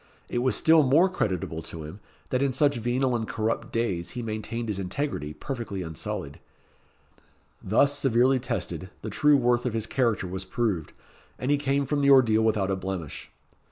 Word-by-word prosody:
It 120 - -1
was 125 -3 +2
still 160 +6 +5
more 150 +7 +4
creditable 90 - -2
to 80 0 -8
him, 80 +7 -9 0.3
that 125 - +1
in 140 -2 +1
such 140 +1 +2
venal 125 +2 0
and 110 -2 -2
corrupt 110 +1 -2
days 95 -7 -1
he 120 - -3
maintained 115 +1 -4
his 105 -3 -2
integrity 95 - -3
perfectly 115 -8 -5
unsullied. 75 -3 -5 1.2
Thus 140 +8 +2
severely 130 +1 +3
tested, 95 -8 -3
the - - -4
true 150 -1 +4
worth 120 -1 +2
of 125 - -2
his 115 -1 0
character 115 -5 0
was 95 +1 -4
proved, 100 -7 -2 0.4
and 130 +3 -1
he 145 - +4
came 140 0 0
from 145 +2 0
the 140 - +4
ordeal 120 -5 +6
without 105 -3 +1
a - - +1
blemish. 95 -5 -6
115 Hz, 175 wpm, -26 LUFS, 95-135 Hz, 1.2 s, ordeal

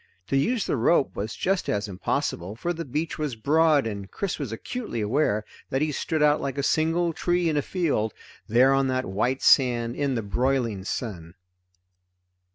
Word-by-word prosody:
To - - +1
use 220 - +1
the - - 0
rope 135 +5 +2
was 105 +3 -4
just 195 0 0
as 105 0 -1
impossible, 95 0 -2
for 170 +10 -2
the 165 0 -5
beach 150 +5 -3
was 150 -5 -2
broad 150 +4 +3
and 100 -3 -5
Chris 200 -5 -3
was 135 -7 -4
acutely 210 - -5
aware 105 -1 +1 0.2
that 135 +3 0
he 155 - 0
stood 155 +1 -1
out 150 0 +4
like 135 0 -3
a 140 - -1
single 165 +3 +1
tree 175 +1 0
in 155 - 0
a 145 - +2
field, 140 - -1 0.4
there 125 +5 +5
on 135 0 +2
the 130 0 0
white 120 +7 -1
sand 120 -3 +4
in 140 -2 0
the 115 - -2
broiling 115 -2 0
sun. 90 -8 -5
135 Hz, 180 wpm, -25 LUFS, 110-155 Hz, 0.4 s, there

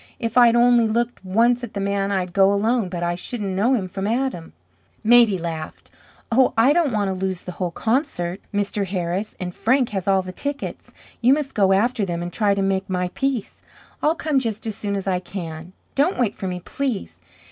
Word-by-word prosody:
"If 230 -2 -3
I'd 240 -2 +6
only 240 -1 +5
looked 235 0 -1
once 235 +6 +2
at 235 - -7
the - - -2
man 200 0 -1
I'd 185 -3 -1
go 195 0 +5
alone, 215 0 +1
but 175 -1 -4
I 175 0 0
shouldn't 195 +1 -4
know 235 +7 +3
him 195 -6 -2
from 195 +2 -4
Adam." 235 -8 -2 0.5
Maidie 230 -3 +6
laughed. 165 -2 -6 0.4
"Oh, 255 +3 +3
I 245 +6 +5
don't 325 -4 +2
want 205 -3 0
to - - -1
lose 185 -2 -2
the 180 - -6
whole 180 0 -3
concert, 190 - -1
Mr. 205 -1 -1
Harris, 185 +2 -3
and 180 -1 -4
Frank, 250 +6 +2
has 195 -2 -4
all 195 -1 +3
the 185 - -7
tickets. 285 +8 -5 0.3
You 250 +3 +5
must 290 -2 -4
go 195 -2 +3
after 220 +3 +2
them 175 -2 -2
and 175 - -6
try 205 -3 +2
to 195 - 0
make 195 0 -1
my 180 -1 -1
peace. 265 +1 -3 0.4
I'll 310 +2 +2
come 305 -4 +1
just 225 -3 -3
as 220 - -2
soon 200 0 -3
as 195 - -3
I 185 -2 0
can. 170 -2 -7 0.2
Don't 295 +7 +1
wait 230 -5 +1
for 190 - -5
me, 180 -1 -4
please. 255 +1 -4
200 Hz, 210 wpm, -22 LUFS, 185-240 Hz, 0.5 s, I'd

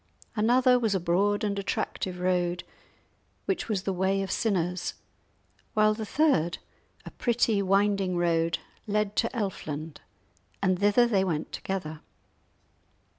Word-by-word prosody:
Another 250 +3 +4
was 220 -4 +1
a - - +2
broad 200 +5 +1
and 200 -1 -1
attractive 190 -2 -3
road, 180 -1 0 0.8
which 360 -9 -2
was 200 -4 -1
the 195 - -1
way 190 +2 +1
of 195 - -4
sinners; 180 -4 -1 0.8
whilst 215 0 +3
the 215 - -4
third, 190 - +2 0.5
a - - -8
pretty 230 -3 +1
winding 195 -1 +2
road, 165 -1 +1 0.3
led 210 0 0
to 230 - +2
Elfland, 160 -8 -4 0.6
and 185 -2 +1
thither 205 +4 +4
they 205 -5 +2
went 160 -5 -2
together. 160 -5 -4
195 Hz, 125 wpm, -28 LUFS, 180-215 Hz, 0.8 s, Another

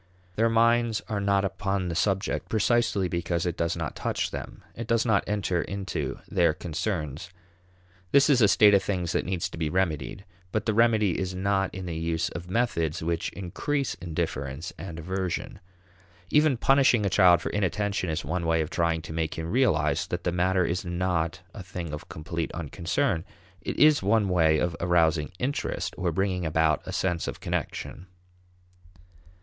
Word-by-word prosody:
Their 115 +3 +3
minds 115 0 +3
are 105 -2 -1
not 100 0 +2
upon 95 -1 -2
the - - -2
subject 95 +4 0
precisely 110 -3 +2
because 85 -1 -1
it 85 -2 -1
does 85 0 -1
not 80 -4 -4
touch - - -2
them; - - -7
it 115 -1 -6
does 115 0 +2
not 110 -4 +3
enter 100 -4 0
into 95 -1 -4
their - - +2
concerns. 85 -2 -3 0.8
This 140 0 +6
is 135 -5 +4
a 105 - +7
state 105 +1 +6
of 100 - +5
things 90 -4 -2
that - - -1
needs 90 -2 -1
to - - -9
be 80 -2 0
remedied, 90 +1 -1 0.3
but 110 +1 -1
the 110 - +1
remedy 110 -4 +3
is 95 -1 -3
not 95 0 0
in 95 -1 -5
the 85 -2 -4
use 80 0 -1
of 90 0 -8
methods 85 -8 0
which 85 0 -1
increase 135 - -2
indifference 80 -3 -4
and 85 -1 -8
aversion. 95 +2 -3 0.7
Even 150 -3 +4
punishing 130 -4 +4
a - - +3
child 90 -2 +6
for - - -4
inattention 100 -1 -1
is 80 -1 -2
one 85 +3 -2
way 80 0 +2
of 80 - -4
trying 85 -1 0
to 80 - -7
make 80 -1 -2
him 80 +1 -4
realize 120 - +2
that 90 0 -4
the 90 - 0
matter 90 +1 +2
is 85 +3 -1
not 85 -2 -1
a - - -8
thing 90 -3 -6
of 75 - -7
complete 80 +1 -4
unconcern; 80 +1 -1 0.4
it - - -4
is 150 -1 +6
one 100 0 +2
way 80 -3 +4
of 85 +2 0
arousing 85 -3 +2
"interest," 130 +8 -2
or 90 -2 -1
bringing 95 +1 -1
about 80 -2 +2
a - - -4
sense 90 -3 -1
of - - -5
connection. 90 - -4
90 Hz, 175 wpm, -27 LUFS, 85-105 Hz, 0.8 s, a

